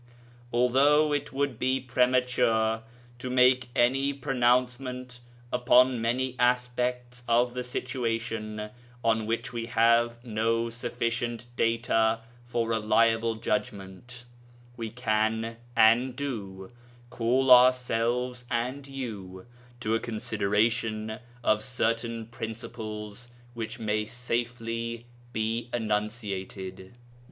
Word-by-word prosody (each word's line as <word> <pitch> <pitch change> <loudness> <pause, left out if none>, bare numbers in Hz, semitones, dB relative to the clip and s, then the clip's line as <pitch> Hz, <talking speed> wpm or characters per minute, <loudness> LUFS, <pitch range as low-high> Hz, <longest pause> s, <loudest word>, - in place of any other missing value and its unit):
Although 140 +5 +4
it 145 0 -2
would 135 -3 -1
be 130 +1 +1
premature 125 -3 +2 0.4
to 130 - -5
make 125 0 +4
any 135 +3 +2
pronouncement 125 -1 0 0.3
upon 125 0 +4
many 125 +3 0
aspects 125 0 0
of 120 +1 +3
the 125 0 -3
situation 115 -4 -3 0.3
on 110 -1 +1
which 115 +1 -2
we 115 -1 -3
have 115 0 +3
no 115 +1 0
sufficient 120 0 -3
data 115 -1 +2 0.3
for 115 -1 -1
a 110 - +1
reliable 115 +1 +3
judgment, 110 +1 -4 0.5
we 115 -2 -4
can, 110 0 0 0.2
and 115 +3 +5
do, 100 -8 -5 0.4
call 125 +3 +2
ourselves 125 0 +4
and 125 +4 -2
you 105 -9 -7 0.4
to 110 -1 0
a 115 - +2
consideration 110 0 -1 0.2
of 110 -2 +3
certain 115 -1 -1
principles 110 -1 -7 0.2
which 115 -2 -5
may 105 -1 -1
safely 115 0 -3 0.3
be 115 +1 -2
enunciated. 105 -3 -3
115 Hz, 100 wpm, -28 LUFS, 110-125 Hz, 0.5 s, and